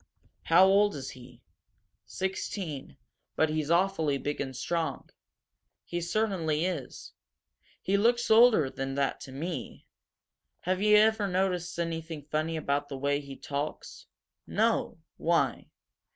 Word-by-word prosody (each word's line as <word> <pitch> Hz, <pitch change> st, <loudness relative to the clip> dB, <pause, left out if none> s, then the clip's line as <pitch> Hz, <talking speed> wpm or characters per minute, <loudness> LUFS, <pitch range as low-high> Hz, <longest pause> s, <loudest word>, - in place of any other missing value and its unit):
"How 175 Hz, +3 st, +6 dB
old 200 Hz, 0 st, +4 dB
is 135 Hz, -2 st, -6 dB
he?" 125 Hz, -2 st, -14 dB, 0.6 s
"Sixteen, 185 Hz, -, -4 dB, 0.4 s
but 160 Hz, -, +2 dB
he's 155 Hz, -1 st, -2 dB
awfully 170 Hz, -5 st, +2 dB
big 145 Hz, +2 st, -3 dB
and 135 Hz, -2 st, -4 dB
strong." 160 Hz, +2 st, -3 dB, 0.7 s
"He 175 Hz, 0 st, -3 dB
certainly 175 Hz, -5 st, 0 dB
is. 170 Hz, -9 st, -5 dB, 0.7 s
He 200 Hz, +1 st, +2 dB
looks 235 Hz, +3 st, +2 dB
older 220 Hz, -, +6 dB
than 135 Hz, 0 st, -4 dB
that, 140 Hz, -1 st, 0 dB
to 130 Hz, -, -9 dB
me. 145 Hz, -1 st, -6 dB, 0.8 s
Have 185 Hz, +1 st, -1 dB
you 210 Hz, 0 st, +6 dB
ever 215 Hz, -1 st, +4 dB
noticed 180 Hz, -2 st, -1 dB
anything 165 Hz, -2 st, -4 dB
funny 155 Hz, +2 st, -2 dB
about 145 Hz, -1 st, -1 dB
the 135 Hz, -, -5 dB
way 140 Hz, +1 st, 0 dB
he 140 Hz, -1 st, -9 dB
talks?" 145 Hz, +2 st, -5 dB, 0.4 s
"No. -, -, +1 dB, 0.2 s
Why? -, -, 0 dB
165 Hz, 125 wpm, -29 LUFS, 145-190 Hz, 0.8 s, How